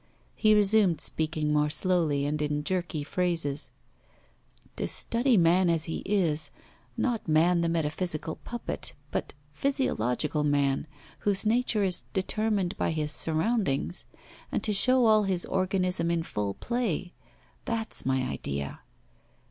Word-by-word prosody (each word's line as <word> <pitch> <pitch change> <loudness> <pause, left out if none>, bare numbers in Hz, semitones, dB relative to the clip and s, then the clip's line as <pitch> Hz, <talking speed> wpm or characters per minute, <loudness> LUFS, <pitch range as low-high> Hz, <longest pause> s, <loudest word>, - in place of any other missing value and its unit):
He 215 -1 +4
resumed 205 -5 +4
speaking 155 -1 0
more 150 0 +2
slowly 155 -4 +2
and 150 +1 -1
in 150 0 -1
jerky 170 -3 -2
phrases: 160 -3 -2 1.1
'To - - -2
study 240 0 +2
man 175 +1 +4
as 165 -2 +1
he 165 - -4
is, 160 -7 +1 0.5
not 240 -6 -1
man 170 +3 +3
the 170 - +1
metaphysical 160 0 -2
puppet 240 0 -4 0.2
but - - -3 0.2
physiological 150 - 0
man, 145 0 +1 0.3
whose 205 0 +1
nature 225 -1 +2
is 185 -2 +2
determined 200 -1 -1
by - - 0
his 155 -2 -2
surroundings, 165 - 0 0.5
and - - -1
to 210 - +1
show 255 +4 +5
all 215 -2 +5
his 185 -2 0
organism 185 -2 0
in 170 -1 0
full 100 -8 -3
play. 225 -8 -2 0.5
That's 225 -1 0
my 130 0 0
idea! 70 - -4
175 Hz, 130 wpm, -28 LUFS, 150-205 Hz, 1.1 s, show